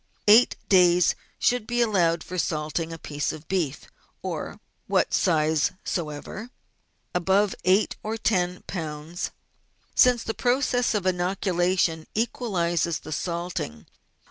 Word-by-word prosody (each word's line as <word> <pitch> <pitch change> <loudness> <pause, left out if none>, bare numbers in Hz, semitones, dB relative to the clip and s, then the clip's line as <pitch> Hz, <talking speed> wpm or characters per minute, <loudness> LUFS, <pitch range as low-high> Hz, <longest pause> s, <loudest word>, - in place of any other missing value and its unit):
Eight 220 +4 +7
days 180 -2 +5 0.2
should 245 -3 +1
be 240 0 -1
allowed 175 -8 +2
for 180 0 -5
salting 160 +1 -2
a 165 - -6
piece 145 -2 -3
of 155 0 -10
beef 175 -7 -1 0.4
of - - -5 0.3
what - - +1
size 160 -3 +2
soever, 170 +7 -4 0.6
above 190 +3 +2
eight 190 +3 +3
or 220 +1 -3
ten 180 -5 0
lb., 160 0 -4 0.6
since 250 -2 +5
the 225 - -3
process 245 -1 +1
of 200 -3 -1
inoculation 180 -2 +1
equalises 175 -8 0
the 155 - -9
salting. 170 - -4
180 Hz, 115 wpm, -25 LUFS, 165-210 Hz, 0.6 s, Eight